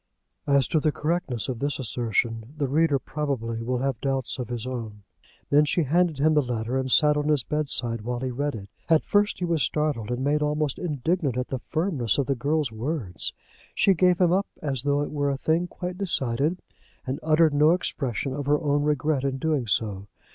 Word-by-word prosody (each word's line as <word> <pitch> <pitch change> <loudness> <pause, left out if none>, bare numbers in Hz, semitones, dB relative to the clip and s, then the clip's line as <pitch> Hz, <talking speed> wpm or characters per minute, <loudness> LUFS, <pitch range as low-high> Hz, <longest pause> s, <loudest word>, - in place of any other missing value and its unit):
As 140 -2 +3
to 160 - +2
the 155 0 +1
correctness 150 -7 -2
of 125 -4 -3
this 140 +1 -1
assertion 115 0 -2
the 145 -2 0
reader 150 +1 +3
probably 130 -6 -3
will 125 +2 -1
have 135 -5 -1
doubts 135 -1 -2
of 120 -2 -4
his 120 -1 -4
own. 115 -5 -6 0.5
Then 145 +1 +6
she 160 +3 +1
handed 165 +2 +2
him 155 +3 +3
the 150 - +4
letter, 120 -1 -3
and 130 -1 -1
sat 150 +2 +6
on 150 0 -1
his 150 -4 +2
bed 150 +1 -2
side 115 -2 -1
while 120 +2 -3
he 130 -1 -2
read 145 +2 -2
it. 100 -2 -8 0.2
At 160 -1 +4
first 205 0 +2
he 180 - -2
was 165 -3 0
startled, 145 -6 0
and 125 +1 -2
made 150 +2 +1
almost 150 -1 0
indignant 155 -3 -1
at 125 - -2
the 130 - -3
firmness 155 - -1
of 140 - +1
the 140 - +1
girl's 145 +1 0
words. 110 - -3 0.4
She 195 - +4
gave 180 0 +3
him 180 -2 +4
up 195 +2 +1
as 135 -5 -2
though 145 +1 +1
it - - -5
were 145 -1 0
a 140 - -1
thing 165 +5 +1
quite 180 +1 -6
decided, 150 -2 0 0.4
and 130 +2 -3
uttered 155 0 +4
no 150 +2 +5
expression 135 -6 -2
of 140 0 -4
her 145 0 +3
own 145 -2 +1
regret 150 -1 0
in 135 -1 -1
doing 145 -4 0
so. 100 -2 -1
140 Hz, 210 wpm, -25 LUFS, 125-155 Hz, 0.5 s, Then